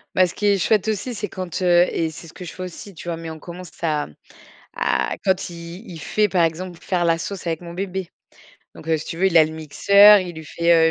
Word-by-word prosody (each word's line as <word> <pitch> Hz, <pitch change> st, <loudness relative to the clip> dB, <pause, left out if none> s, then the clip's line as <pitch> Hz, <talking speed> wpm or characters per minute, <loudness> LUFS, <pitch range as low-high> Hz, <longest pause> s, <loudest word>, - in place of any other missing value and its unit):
Ben, 185 Hz, -1 st, +5 dB
ce -, -, -10 dB
qui 210 Hz, -, -3 dB
est 200 Hz, -1 st, +4 dB
chouette 210 Hz, +3 st, +2 dB
aussi, 220 Hz, +4 st, -3 dB
c'est 210 Hz, -1 st, -3 dB
quand, 185 Hz, -1 st, -5 dB
heu, 175 Hz, 0 st, +5 dB
et 160 Hz, -1 st, -1 dB
c'est 165 Hz, +2 st, -11 dB
ce -, -, -14 dB
que 180 Hz, -, -9 dB
je -, -, -8 dB
fais -, -, -9 dB
aussi, 185 Hz, +2 st, -8 dB
tu 170 Hz, -, -11 dB
vois? 170 Hz, -1 st, -2 dB
Mais 165 Hz, -1 st, -7 dB
on 160 Hz, -, -9 dB
commence 175 Hz, +1 st, -10 dB
à 155 Hz, -3 st, 0 dB, 0.7 s
à 65 Hz, -1 st, 0 dB
quand 190 Hz, -2 st, +1 dB
il 170 Hz, +3 st, -9 dB
il 165 Hz, -, -8 dB
fait 210 Hz, +7 st, +1 dB
par 180 Hz, -2 st, +2 dB
exemple 175 Hz, +2 st, -4 dB
pour -, -, -19 dB
faire 180 Hz, -2 st, +1 dB
la 165 Hz, -1 st, +3 dB
sauce 195 Hz, +2 st, -6 dB
avec 165 Hz, -1 st, -1 dB
mon 170 Hz, -1 st, -9 dB
bébé. 190 Hz, -1 st, -4 dB, 0.7 s
Donc, 160 Hz, -, -12 dB
heu, 160 Hz, -, +3 dB
si 155 Hz, -, -6 dB
tu -, -, -6 dB
veux 190 Hz, -, +3 dB
il 170 Hz, -, +2 dB
a 160 Hz, -, +8 dB
le 155 Hz, -, -4 dB
mixeur, 200 Hz, +7 st, +6 dB
il 180 Hz, -3 st, -5 dB
lui 160 Hz, -1 st, -9 dB
fait, 165 Hz, 0 st, +3 dB
175 Hz, 265 wpm, -22 LUFS, 165-190 Hz, 0.7 s, a